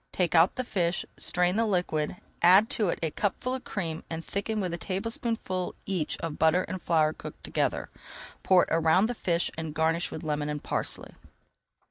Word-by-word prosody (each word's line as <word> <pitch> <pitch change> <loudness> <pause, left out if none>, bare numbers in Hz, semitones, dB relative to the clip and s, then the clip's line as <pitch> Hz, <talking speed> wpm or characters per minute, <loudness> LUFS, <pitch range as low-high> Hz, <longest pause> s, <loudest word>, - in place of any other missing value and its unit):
Take 180 -2 0
out 170 +2 +5
the 255 - -2
fish, 175 -7 -1
strain 180 +2 +2
the 230 - +3
liquid, 175 -5 0 0.3
add 190 +5 +6
to 210 -5 +2
it - - -1
a 160 - 0
cupful 205 - -1
of 260 - -4
cream 165 -6 -4
and 165 0 -5
thicken 215 +2 -2
with 180 -4 -2
a - - -2
tablespoonful 195 -1 -2
each 185 -6 -1
of 165 -2 -4
butter 160 +4 +4
and 185 -1 -5
flour 155 -2 +2
cooked - - -10
together. - - -1 0.5
Pour 185 -2 +5
it - - -4
around 165 +4 +4
the 240 - -1
fish 175 -6 0
and 160 -2 -5
garnish 160 +2 +1
with - - -7
lemon 150 -1 -1
and 150 -1 -4
parsley. - - -2
175 Hz, 185 wpm, -28 LUFS, 160-200 Hz, 0.5 s, add